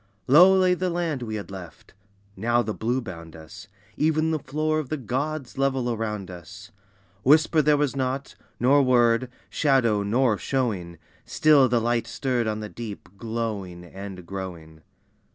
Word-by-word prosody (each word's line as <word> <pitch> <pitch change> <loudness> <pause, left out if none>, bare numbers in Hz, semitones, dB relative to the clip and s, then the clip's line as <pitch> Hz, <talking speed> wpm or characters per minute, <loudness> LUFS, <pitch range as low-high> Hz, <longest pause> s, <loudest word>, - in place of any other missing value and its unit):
Low 180 +8 +7
lay 185 -1 +4
the 180 +1 -1
land 170 -6 -2
we 110 -2 -4
had 100 -2 -6
left. 90 -3 -11 0.4
Now 120 +4 +1
the 110 - -3
blue 120 +5 -1
bound 85 -7 -9
us, 80 +6 -12 0.3
Even 155 +1 +1
the 155 - 0
Floor 155 +3 -1
of 145 -5 -5
the 155 - -2
Gods 135 +3 -4
level 135 -3 +1
around 105 -4 -4
us. 90 +4 -11 0.5
Whisper 155 +4 +4
there 150 0 +3
was 145 -2 0
not, 135 +1 -2 0.3
nor 135 +4 +5
word, 120 -1 +3 0.2
shadow 125 -8 +2
nor 110 +2 +1
showing, 100 -11 -2 0.3
Still 145 -4 +4
the 120 0 +2
light 120 +1 0
stirred 125 -4 -1
on 110 0 -2
the 105 - -5
deep, 110 -3 -8
glowing 110 -6 -4
and 95 0 -9
growing. 85 -4 -8
120 Hz, 155 wpm, -25 LUFS, 100-140 Hz, 0.5 s, Low